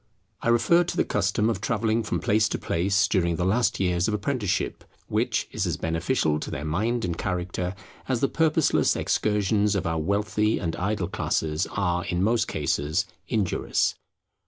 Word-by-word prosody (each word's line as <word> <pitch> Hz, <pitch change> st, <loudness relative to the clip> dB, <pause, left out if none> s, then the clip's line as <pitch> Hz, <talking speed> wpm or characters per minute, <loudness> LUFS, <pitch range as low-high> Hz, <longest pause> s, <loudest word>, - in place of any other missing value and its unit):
I -, -, -3 dB
refer 120 Hz, +10 st, +4 dB
to 175 Hz, -, -4 dB
the -, -, +4 dB
custom 105 Hz, +1 st, +1 dB
of 110 Hz, -5 st, -1 dB
travelling 110 Hz, 0 st, +1 dB
from 105 Hz, -, -2 dB
place 105 Hz, +1 st, +2 dB
to -, -, -1 dB
place 95 Hz, +4 st, +1 dB
during 85 Hz, -4 st, +1 dB
the 90 Hz, -, -1 dB
last 110 Hz, +4 st, +1 dB
years 90 Hz, 0 st, +1 dB
of 110 Hz, -, 0 dB
apprenticeship; 105 Hz, -2 st, -2 dB, 0.2 s
which -, -, 0 dB
is -, -, -1 dB
as -, -, -1 dB
beneficial 80 Hz, -, 0 dB
to -, -, -5 dB
their 75 Hz, -, -4 dB
mind 110 Hz, +9 st, 0 dB
and 85 Hz, -2 st, -2 dB
character, 90 Hz, 0 st, -3 dB, 0.3 s
as 130 Hz, -3 st, +1 dB
the 135 Hz, -, +2 dB
purposeless 160 Hz, 0 st, +2 dB
excursions 105 Hz, 0 st, +1 dB
of 100 Hz, -, -1 dB
our 80 Hz, -1 st, 0 dB
wealthy 105 Hz, +5 st, +1 dB
and 80 Hz, -3 st, -2 dB
idle 95 Hz, -1 st, -1 dB
classes 80 Hz, -2 st, -1 dB
are 90 Hz, -3 st, 0 dB
in 90 Hz, +1 st, -1 dB
most 115 Hz, +2 st, +2 dB
cases 75 Hz, +7 st, 0 dB, 0.2 s
injurious. 105 Hz, -7 st, 0 dB
100 Hz, 170 wpm, -25 LUFS, 90-110 Hz, 0.3 s, refer